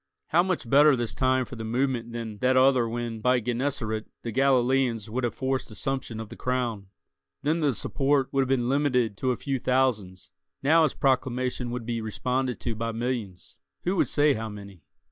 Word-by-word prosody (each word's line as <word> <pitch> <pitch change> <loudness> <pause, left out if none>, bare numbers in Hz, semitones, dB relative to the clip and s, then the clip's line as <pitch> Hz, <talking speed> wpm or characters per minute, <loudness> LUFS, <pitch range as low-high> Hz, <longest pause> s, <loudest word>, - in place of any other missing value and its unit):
How 170 - +4
much 180 -8 -2
better 145 +3 +6
this 120 -2 -3
time 130 -1 +1
for 125 - -9
the 115 - -6
movement 120 0 -1
than 115 -3 -6
that 130 +2 +3
other 130 -3 +4
when, 120 -1 -4
by 125 +2 +3
Gennesaret, 120 -2 -2 0.2
the 115 - -3
Galileans 125 -3 +2
would 130 +3 -2
have 120 -3 -1
forced 130 0 -2
assumption 130 0 -4
of 110 -2 -7
the - - -9
crown? 120 -6 -2 0.6
Then 155 +3 +1
the 150 -3 +2
support 135 +4 +1
would 135 - +3
have 130 - -1
been 125 -3 +1
limited 125 -5 +1
to 130 - -1
a 125 - -2
few 135 -2 -2
thousands; 120 - 0 0.3
now 160 +4 +5
his 155 -4 +2
proclamation 130 -2 0
would 120 -1 -4
be 115 -1 -2
responded 125 +3 -2
to 115 - -2
by 115 +1 -3
millions—who 115 - -5
could - - +2
say 145 0 +3
how 110 -2 -4
many? 100 -4 -10
125 Hz, 185 wpm, -26 LUFS, 115-135 Hz, 0.6 s, better